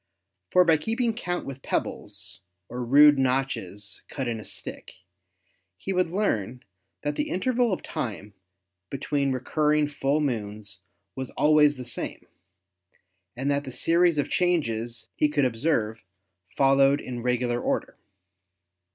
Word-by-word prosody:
For 180 0 +5
by 165 -2 +5
keeping 230 - -1
count 175 -6 -3
with 135 -1 -7
pebbles - - -3 0.3
or 125 +1 -4
rude 145 +3 +7
notches 125 -7 -2
cut 135 -3 -4
in 115 -2 -2
a - - -8
stick - - -8 0.8
he 195 - -4
would 180 -2 +1
learn 125 - -1 0.4
that 145 0 -1
the - - -2
interval 240 +4 +1
of 185 - -2
time 110 -9 -5 0.6
between 140 0 -1
re 130 -1 -2
curring 150 +2 +2
full 145 0 0
moons 105 -7 -3 0.4
was 130 -1 -5
always 150 -1 +4
the 125 - -7
same, 120 - -4 1.1
and 135 +4 -1
that 140 0 0
the 135 - -7
series 170 +4 +3
of 145 - +1
changes 120 -10 -1
he 150 - +2
could 145 -2 +2
observe 115 -3 0 0.6
followed 135 +1 +5
in 125 -3 -6
regular 120 0 0
order. - - -2
135 Hz, 135 wpm, -26 LUFS, 120-155 Hz, 1.1 s, rude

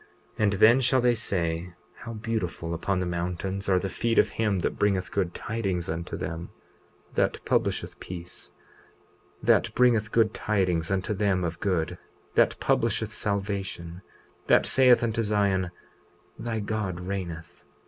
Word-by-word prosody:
20:40 - - +2
And 105 -1 +3
then 115 +6 +6
shall 130 +1 +3
they 120 -1 +4
say: 90 -5 -2 0.2
How 115 - -7
beautiful 105 -7 -3
upon 90 +3 -1
the 90 - -1
mountains 90 +3 -3
are 95 - +4
the 95 - -1
feet 115 +4 -1
of - - +5
him 105 -3 0
that - - -2
bringeth 95 -3 +1
good 90 -3 -1
tidings 95 -6 -2
unto 80 +1 -4
them, 80 +1 -5 0.6
that - - +1
publisheth - - 0
peace; 90 -1 -8 0.9
that - - +4
bringeth 115 -4 +3
good 110 -2 +3
tidings 90 -6 0
unto 95 +3 0
them 100 -2 +1
of 85 -1 -3
good, 90 -3 -1 0.3
that - - +3
publisheth - - +1
salvation; 95 -4 -3 0.5
that - - +5
saith 130 -2 +5
unto 115 0 0
Zion: 100 -4 +1 0.7
Thy 115 -1 -3
God 100 -4 -2
reigneth! 90 -3 -6
95 Hz, 145 wpm, -27 LUFS, 90-110 Hz, 0.9 s, then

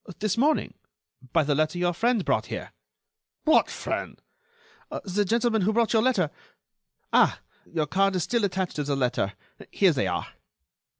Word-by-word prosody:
"This 215 -2 0
morning, 290 +6 +1 0.6
by 165 - +3
the 145 0 +1
letter 155 +4 0
your 175 0 +1
friend 230 +2 +1
brought - - +1
here." - - -6 0.7
"What 315 - +4
friend?" - - -4 0.8
"The 200 +2 0
gentleman 225 +2 +1
who 210 +4 +2
brought 230 0 +2
your 220 - +4
letter.... 210 - +1 0.8
Ah! - - +4 0.3
your 160 -2 0
card 195 +5 +1
is 180 - 0
still 235 +2 0
attached 190 -3 -1
to 150 - 0
the 140 0 -1
letter. 125 -6 0 0.4
Here - - +3
they - - 0
are." - - -2
190 Hz, 160 wpm, -26 LUFS, 155-225 Hz, 0.8 s, What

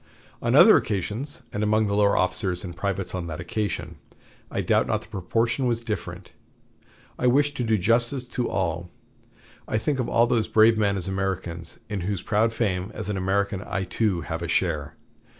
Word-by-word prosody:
On - - +1
other - - +9
occasions, 110 - -3
and 105 - -2
among 110 +1 +2
the 100 - -1
lower 100 0 +3
officers 90 -1 0
and 90 -2 -7
privates 100 +1 -2
on 90 -2 -3
that 80 0 -5
occasion, 100 +4 -3 0.5
I - - -2
doubt - - +2
not - - -1
the - - -16
proportion 115 +7 0
was 115 -1 -1
different. 90 -4 -5 0.9
I 125 - +2
wish 145 +3 +3
to 130 - -3
do 110 -2 +2
justice 115 +6 +2
to 125 -1 -2
all. 85 -1 -2 0.8
I - - 0
think 135 +4 -1
of 120 - -1
all 115 +1 +4
those 120 -2 +1
brave 110 +1 +5
men 100 -2 +1
as 90 - -4
Americans, 95 -3 -3
in 105 -3 -3
whose 95 0 -3
proud 110 +1 +2
fame, 100 -5 -1
as 105 -1 -4
an 105 - -1
American, 95 +1 0
I, 95 -1 -3
too, 95 -1 0
have 80 0 -4
a 85 - -3
share. 80 -4 0
100 Hz, 185 wpm, -25 LUFS, 90-115 Hz, 0.9 s, other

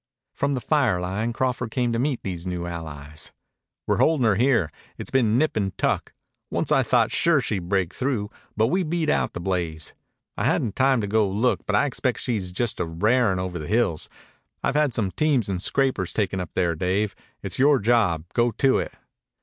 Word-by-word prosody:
From 140 0 0
the 125 - -3
fire 130 - +2
line 100 +6 -2
Crawford 125 0 -1
came 120 0 0
to 115 - 0
meet 135 -1 -1
these 90 -3 -4
new 90 -1 -3
allies. 80 -3 -7 0.5
"We're - - +1
holdin' 155 -6 +3
her 110 - +4
here. 115 - +2 0.3
It's - - -6
been 115 -4 +3
nip 155 +4 +1
an' 100 -3 -1
tuck. - - 0 0.4
Once - - -2
I - - +5
thought - - +2
sure 170 -4 +3
she'd 95 -8 -3
break 95 -3 +1
through, 125 -6 -2 0.3
but 110 - +4
we 185 +2 +1
beat 165 -2 -1
out - - +1
the - - -5
blaze. 85 -4 -3 0.4
I - - -2
hadn't 110 - +1
time 130 -2 +3
to 105 - -2
go 105 -1 +2
look, 110 +6 0
but - - +1
I - - +4
expect 130 -2 -1
she's 100 -7 -2
just 115 +4 -2
a - - +1
r'arin' 105 +5 +2
over 90 -1 -3
the 75 - -6
hills. 110 -8 0 0.5
I've - - +1
had 150 -2 +2
some 105 -5 -1
teams 140 -7 +1
and 90 -2 -2
scrapers 130 -5 0
taken 100 -3 -1
up 90 -3 -4
there, 85 -2 +2
Dave. 95 +5 -1 0.3
It's - - -5
yore 140 +1 +5
job. 105 -8 +2
Go 120 0 +3
to 135 -1 +3
it." - - -4
110 Hz, 200 wpm, -24 LUFS, 90-130 Hz, 0.5 s, I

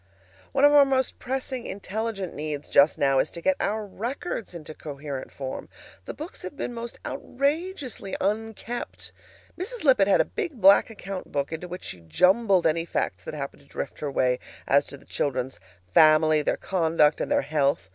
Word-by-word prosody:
One 275 +1 +4
of 290 - +7
our 290 -1 +9
most 265 -2 0
pressing 260 -1 -3
INTELLIGENT 200 0 -4
needs 150 -1 -4
just 145 +2 +5
now 135 -1 +3
is - - +1
to 170 - -8
get 190 +2 +2
our 215 +1 -1
records 230 - -5
into 155 -2 -8
coherent 140 -3 -7
form. 135 -1 -6 0.4
The - - -6
books 310 +4 -8
have 185 - -7
been 245 - -3
most 235 0 -6
outrageously 280 - -2
unkept. 210 - -3 0.5
Mrs. 450 +5 -5
Lippett 255 -9 +5
had 200 - +4
a - - +4
big 345 - -4
black 195 +3 +7
account 195 -3 -7
book 140 +1 -1
into 160 +2 -5
which 180 +1 -7
she 90 - -7
jumbled 185 - +3
any 165 +1 +2
facts 95 - -2
that - - -5
happened 140 -2 -6
to 140 - -23
drift - - -6
her 150 - -2
way 125 -1 +2 0.3
as 140 +1 +4
to 140 - -8
the - - -20
children's 130 -6 -2 0.3
family, 155 - +6
their - - 0
conduct, 160 -4 +2
and - - -3
their - - +3
health. 140 -7 +1
185 Hz, 180 wpm, -26 LUFS, 145-235 Hz, 0.5 s, our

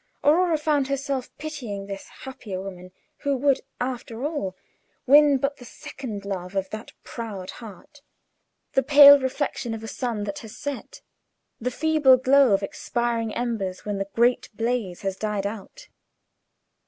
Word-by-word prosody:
Aurora 330 +2 +4
found 295 -3 +1
herself 275 -1 -2
pitying 250 -10 -6
this 195 -1 -7 0.2
happier 220 -8 -6
woman, 185 -1 -8 0.3
who 280 -1 -1
would, 275 +1 +2 0.2
after 245 -1 -4
all, 290 - -3 0.5
win 290 +1 +6
but 275 +2 -1
the 250 - -13
second 220 -4 -8
love 190 -1 -5
of 195 -1 -2
that 215 +1 -7
proud 205 -5 -6
heart 230 +6 -12 0.7
the 270 - +4
pale 285 +1 +9
reflection 260 -3 -2
of 225 - -8
a - - -6
sun 230 -3 -3
that 200 -1 -4
has 220 +1 -11
set; 285 -3 -6 0.6
the 250 - -1
feeble 295 -1 +4
glow 265 0 +5
of 195 0 +2
expiring 235 +2 -2
embers 215 -7 -3
when 205 -1 -2
the 195 0 -3
great 240 +2 +2
blaze 225 -6 -2
has 195 -1 -2
died 210 -2 -2
out. 220 - -7
240 Hz, 150 wpm, -25 LUFS, 200-275 Hz, 0.7 s, pale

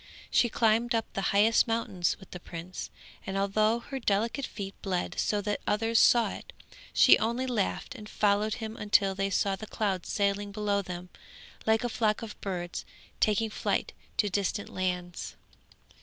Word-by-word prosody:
She 240 - +4
climbed 230 +2 +2
up 225 - +1
the 195 - -2
highest 215 +4 +4
mountains 225 -6 0
with 190 - -15
the 180 - -7
prince, 175 +1 -7 0.3
and 195 0 -3
although 215 +3 +2
her 265 +3 -6
delicate 230 +4 0
feet 195 -2 -6
bled 185 -3 -2
so 210 -1 +1
that 205 0 -2
others 225 +2 +2
saw 235 -2 +5
it, - - -9 0.4
she - - +7
only 235 +4 0
laughed 235 -6 -1
and 210 0 -10
followed 210 +1 +2
him 225 -2 -6
until 205 -3 +3
they 195 +1 -1
saw 195 0 +1
the 215 +3 -9
clouds 195 -5 -2
sailing 200 0 0
below 205 -1 0
them 180 -1 -7 0.6
like 220 +1 +3
a - - +1
flock 220 -2 0
of 215 -2 -8
birds, 175 -3 -4 0.4
taking 215 +1 +2
flight - - -1 0.2
to 210 - +3
distant 200 +1 -1
lands. 180 -2 -3
205 Hz, 165 wpm, -29 LUFS, 195-225 Hz, 0.6 s, she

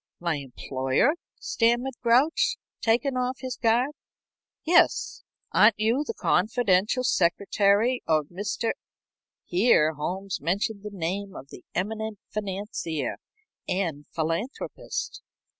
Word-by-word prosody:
"My 170 -3 0
employer?" 135 - 0 0.3
stammered 240 +3 +1
Grouch, 310 - +3 0.2
taken 245 +4 +2
off 250 0 -1
his 255 -2 -4
guard. 235 +4 +2 0.7
"Yes. 345 +2 +3 0.3
Aren't 215 0 +5
you 225 +7 +2
the - - -3
confidential 215 +3 +2
secretary 200 +4 +2
of 155 -2 +2
Mr. 205 +5 -2 0.4
?" - - -68
Here 175 -5 +4
Holmes 185 +6 -4
mentioned 200 +6 -1
the 210 - -6
name 195 +2 -3
of 135 - -10
the - - -12
eminent 220 +3 -2
financier 190 - -3 0.5
and 165 -6 -2
philanthropist. 165 - -3
205 Hz, 110 wpm, -26 LUFS, 175-240 Hz, 0.7 s, Aren't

